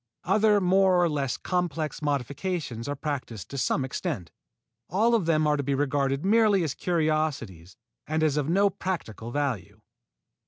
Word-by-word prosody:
Other 210 +3 +4
more 190 0 +4
or 175 - +4
less 140 -5 -1
complex 165 -5 -2
modifications 140 -2 -2
are 145 - -2
practised 135 -8 -5
to 140 - -6
some 130 +2 +1
extent. 95 -8 -4 0.6
All 220 +7 +2
of 210 -8 +2
them 155 -2 +3
are 150 0 +2
to - - 0
be 140 0 -1
regarded 140 +1 0
merely 210 -2 +4
as 150 -4 -1
curiosities 155 - -1 0.3
and 155 +1 0
as 150 -3 +2
of 150 0 0
no 200 +3 +3
practical 120 - -5
value. 135 -5 -3
150 Hz, 155 wpm, -27 LUFS, 135-180 Hz, 0.6 s, Other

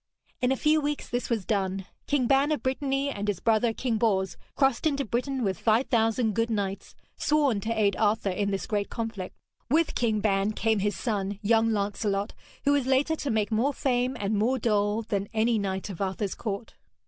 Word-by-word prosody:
In 250 +1 +2
a 265 - +1
few 310 +2 +3
weeks 295 0 -2
this 245 -1 -3
was 225 -6 -1
done. 195 -2 -1 0.2
King 280 -3 +2
Ban 275 +4 +3
of 305 - -1
Brittany 270 +1 0
and 205 -4 -4
his 200 -4 -1
brother, 225 +2 +2
King 225 -1 -1
Bors, 190 -4 +1 0.2
crossed 270 +2 +2
into 280 -2 0
Britain 255 +3 -1
with 190 -4 -1
five 230 +3 +2
thousand 225 -1 +2
good 230 +2 0
knights, 200 -3 -3 0.2
sworn 290 -8 +2
to 220 - -4
aid 200 -2 +3
Arthur 210 -2 +1
in 200 +2 -1
this 195 -1 -2
great 205 -2 -1
conflict. 225 -5 -5 0.3
With 315 +4 +2
King 220 -3 +1
Ban 200 0 +1
came 220 -1 +1
his 205 +1 0
son, 205 -4 -2
young 225 +1 +3
Lancelot, 205 0 -1 0.3
who 285 - +4
was 285 -3 +2
later 270 +4 +2
to 285 - -3
make 220 -2 0
more 250 +6 +1
fame 250 -1 0
and 205 +1 -1
more 230 +6 +2
dole 210 -1 +1
than 200 -2 -2
any 225 +1 +2
knight 190 -1 -2
of 180 - -8
Arthur's 195 +1 -1
court. 210 0 -5
225 Hz, 195 wpm, -27 LUFS, 205-260 Hz, 0.3 s, who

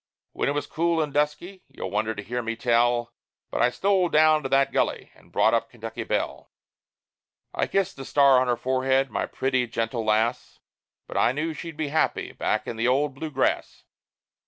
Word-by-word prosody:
When - - -1
it - - 0
was 145 - -2
cool 170 0 0
and 150 -3 -1
dusky 150 +6 -1
you'll 130 -8 -7
wonder 110 +2 -1
to 100 - -6
hear 120 +4 -3
me 115 0 -3
tell 120 0 +1 0.4
But - - -1
I 120 - +5
stole 190 +5 +1
down 155 0 +4
to 135 - -4
that 135 0 +3
gully, - - -1
and - - -23
brought 110 - +3
up 115 0 +1
Kentucky 115 -1 -7
Belle. - - -3 1.0
I - - 0
kissed 195 -4 -1
the 135 - -6
star 140 -2 +5
on 130 - 0
her 120 -1 +1
forehead 130 +2 +1
my - - -2
pretty 130 -2 0
gentle 115 0 -2
lass 110 +2 0 0.5
But - - -6
I 120 - +3
knew 155 +4 -2
that - - -4
she'd 165 -3 -7
be 155 -2 -2
happy 160 +2 0
back - - -1
in 115 - -5
the 115 +2 +1
old 140 +3 +2
Blue 155 +4 -6
Grass. 135 -3 -1
130 Hz, 200 wpm, -25 LUFS, 120-150 Hz, 1.0 s, I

